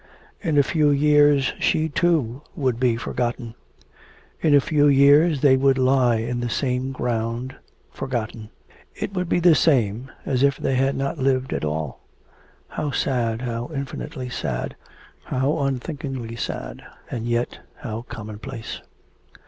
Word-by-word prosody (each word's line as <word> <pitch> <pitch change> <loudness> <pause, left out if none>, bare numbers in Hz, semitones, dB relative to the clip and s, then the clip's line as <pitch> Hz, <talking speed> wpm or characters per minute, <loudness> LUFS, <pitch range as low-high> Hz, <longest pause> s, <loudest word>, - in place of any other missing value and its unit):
In 160 -6 0
a 140 - +6
few 150 +1 +2
years 145 -1 +4
she, 155 0 +2
too, 145 -6 +1
would 130 -5 0
be 125 -2 +3
forgotten; 120 0 -3 0.9
in 155 -3 +4
a - - +8
few 145 +1 +2
years 145 +2 +5
they 140 -3 +6
would 135 0 +3
lie 130 -2 +3
in 120 +2 -2
the 120 0 -2
same 130 +1 -1
ground 120 0 -2 0.4
forgotten; 115 -3 -4 0.5
it 195 - -4
would 180 -2 -2
be - - +2
the 175 -1 +6
same 125 -6 +2 0.2
as 130 -2 0
if 140 0 +3
they - - -1
had 135 +1 +1
not 140 +3 -2
lived 130 -1 +1
at - - -3
all.... 75 -2 -3 0.7
How 150 - -3
sad, 120 -4 -1
how 120 -1 -3
infinitely 140 -1 -5
sad, 65 - -3 0.5
how 135 +4 0
unthinkingly 135 -3 -3
sad, 115 - -5 0.3
and 115 -1 -3
yet 120 +1 -1 0.2
how 115 -5 -4
common 110 -3 -8
place. 120 -3 -7
130 Hz, 145 wpm, -23 LUFS, 120-145 Hz, 0.9 s, a